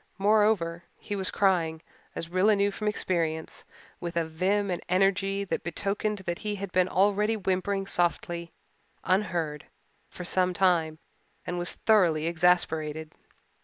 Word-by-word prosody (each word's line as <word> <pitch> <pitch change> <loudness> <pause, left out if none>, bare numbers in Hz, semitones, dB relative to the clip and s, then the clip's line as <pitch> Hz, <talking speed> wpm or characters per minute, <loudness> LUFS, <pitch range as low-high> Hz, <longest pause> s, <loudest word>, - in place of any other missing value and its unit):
Moreover, 200 -5 +2
he 205 - -5
was 190 -2 0
crying, 170 -5 +1 0.4
as 165 - -4
Rilla 185 +5 +3
knew 200 0 +2
from 210 +2 -4
experience, 165 -6 -2 0.4
with 170 -1 -5
a 165 - +1
vim 190 +5 0
and 175 - -2
energy 195 +1 +2
that 195 - -3
betokened 200 +4 -2
that 175 0 -2
he 210 -1 -3
had 200 -1 -6
been 185 0 +3
already 205 +3 +2
whimpering 195 0 -1
softly 175 -2 -1 0.5
unheard 170 -6 -1 0.4
for 180 - -8
some 180 0 +1
time 170 -5 +2 0.5
and 175 - -3
was 175 - -3
thoroughly 175 -8 +3
exasperated. 160 -2 +1
185 Hz, 135 wpm, -27 LUFS, 170-200 Hz, 0.5 s, Rilla